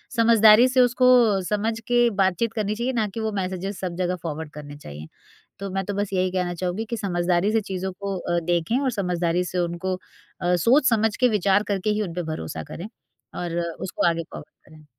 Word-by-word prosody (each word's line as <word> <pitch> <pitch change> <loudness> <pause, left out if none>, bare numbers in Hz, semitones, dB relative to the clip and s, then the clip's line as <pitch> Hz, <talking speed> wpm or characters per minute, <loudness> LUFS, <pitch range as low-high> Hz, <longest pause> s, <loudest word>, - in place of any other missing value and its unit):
समझदारी 230 0 +6
से 255 0 +3
उसको 245 -4 +4
समझ 220 +2 -1
के 240 -1 +4
बातचीत 190 +5 0
करनी 210 -1 -1
चाहिए 240 +4 -2
ना 225 -3 0
कि - - -5
वो 220 0 -1
मैसेजेज़ 190 0 -3
सब 180 -2 -4
जगह 180 0 -1
फ़ॉरवर्ड 160 -1 -5
करने 145 -1 -9
चाहिए। 75 - -10 0.5
तो 200 - -5
मैं 195 0 -1
तो 205 - -3
बस 205 0 -2
यही 185 -1 +1
कहना 180 -1 -1
चाहूँगी 185 +5 -3
कि 235 - -2
समझदारी 180 -1 0
से 225 0 +2
चीज़ों 190 -1 -4
को 200 -1 -3
अ, 175 -1 -1
देखें 175 +7 0
और 270 -2 0
समझदारी 180 -4 0
से - - -2
उनको 175 +2 -2 0.5
अ, 180 0 +2
सोच-समझ 225 - +3
के 255 - +4
विचार 205 -1 +2
करके 200 +2 -1
ही 210 0 +1
उनपे 180 -3 -3
भरोसा 80 - -5
करें 180 +5 -6 0.5
और 175 -1 -3
उसको 170 +1 -2
आगे 165 -1 0
फ़ॉरवर्ड 145 - -12
करें। 155 -1 -16
190 Hz, 195 wpm, -24 LUFS, 175-220 Hz, 0.5 s, समझदारी